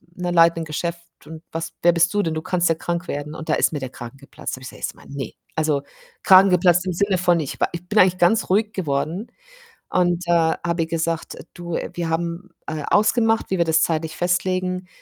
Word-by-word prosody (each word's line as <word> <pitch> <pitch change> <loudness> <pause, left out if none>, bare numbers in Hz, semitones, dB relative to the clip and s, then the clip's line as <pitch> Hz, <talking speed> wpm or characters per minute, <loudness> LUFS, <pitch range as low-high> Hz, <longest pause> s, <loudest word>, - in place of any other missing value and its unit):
ne, 180 -1 -3
leiten 170 -1 +5
'nen - - -4
Geschäft 170 +2 -3 0.3
und 160 +1 -10
was 165 0 -5
wer 175 - +6
bist 170 +1 +3
du 205 - +2
denn? 160 - -1
Du 155 - -3
kannst 180 +1 0
ja 165 - +2
krank 170 +2 -3
werden.“ 145 +1 -4
Und 160 - -8
da - - +3
ist - - +2
mir 145 - -2
der 130 -1 -5
Kragen 120 +1 -10
geplatzt. 140 -1 -7
Habe 130 - -14
ich - - -7
gesagt - - -14
erstmal: - - -5
„Ne“ 135 -5 -5 0.2
also 155 -3 +1 0.4
Kragen 190 +1 +7
geplatzt 180 0 +3
im 180 - -1
Sinne 200 +1 +1
von, 175 -1 +3
ich 140 - -6
wa - - +2
ich 170 +1 -6
bin 210 - +2
eigentlich 185 0 +5
ganz 180 +5 +2
ruhig 210 +3 +2
geworden 165 - -2 0.6
und, 175 -1 +1
äh, - - -2 0.4
habe 170 -1 0
ihr 160 - -3
gesagt: 165 -1 -2
„Äh, - - -11
du, 175 -1 -5 0.2
wir 170 -1 -3
haben, 170 +3 -3 0.2
äh, 155 -2 -4
ausgemacht, 225 +1 +3
wie 190 - 0
wir 170 - +3
das 160 0 +3
zeitlich 160 -1 -1
festlegen. 180 +1 -1
170 Hz, 230 wpm, -22 LUFS, 160-180 Hz, 0.6 s, Kragen